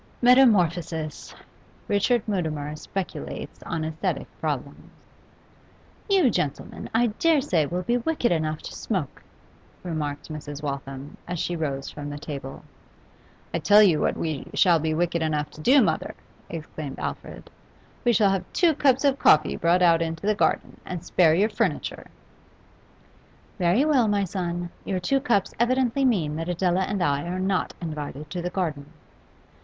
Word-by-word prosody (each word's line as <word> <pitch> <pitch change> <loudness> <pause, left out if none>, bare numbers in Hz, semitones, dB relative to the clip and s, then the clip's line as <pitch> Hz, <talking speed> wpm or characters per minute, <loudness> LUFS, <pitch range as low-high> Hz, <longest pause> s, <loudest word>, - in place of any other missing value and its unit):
Metamorphosis! 175 - +3 0.5
Richard 210 +3 +1
Mutimer 155 -7 -2
speculates 185 +4 -6
on 165 -2 -3
asthetic 160 0 -2
problems. - - -4 1.2
'You, 370 -11 +4
gentlemen, 140 -7 -3
I 225 -1 +2
dare 330 -3 +4
say 175 - +1
will 180 +3 -3
be 240 +6 +1
wicked 245 -1 0
enough 155 -2 -1
to - - -7
smoke,' 185 - -3 0.6
remarked 155 -5 -4
Mrs. 145 -1 -7
Waltham, 140 -1 -5
as 180 0 -3
she 175 +2 -2
rose 140 -4 -3
from 145 -1 -7
the 145 - -6
table. 140 -2 -7 0.9
'I 170 - 0
tell 205 +7 +6
you 170 -7 +4
what - - 0
we 155 -4 -3
shall 175 -4 +5
be 155 0 -1
wicked 170 0 0
enough 150 -2 -1
to 155 - -11
do, 265 - +6
mother,' - - -1 0.3
exclaimed 155 -3 -6
Alfred. - - -6 0.5
'We 240 - +3
shall 205 -3 +4
have 190 -2 -3
two 340 -3 +4
cups 270 -2 +2
of 275 -1 +2
coffee 155 -1 +5
brought 175 +2 +2
out 165 -1 +5
into 165 +2 -3
the 215 - +3
garden, 205 - 0
and 180 -3 -6
spare 160 -3 +4
your 200 +5 +3
furniture!' - - -2 1.5
'Very 180 +10 +3
well, 270 -7 +3
my 205 -1 +1
son. 175 -2 -3
Your 190 -2 -2
two 270 +10 +1
cups 235 -8 +1
evidently 255 +2 +2
mean 165 - +1
that 165 +2 -4
Adela 180 +1 +1
and 195 -2 -1
I 140 -1 +1
are 180 +1 -3
not 190 0 -1
invited 150 -2 -6
to 180 - -3
the 180 - -2
garden. 155 -7 -3
175 Hz, 155 wpm, -25 LUFS, 155-210 Hz, 1.5 s, tell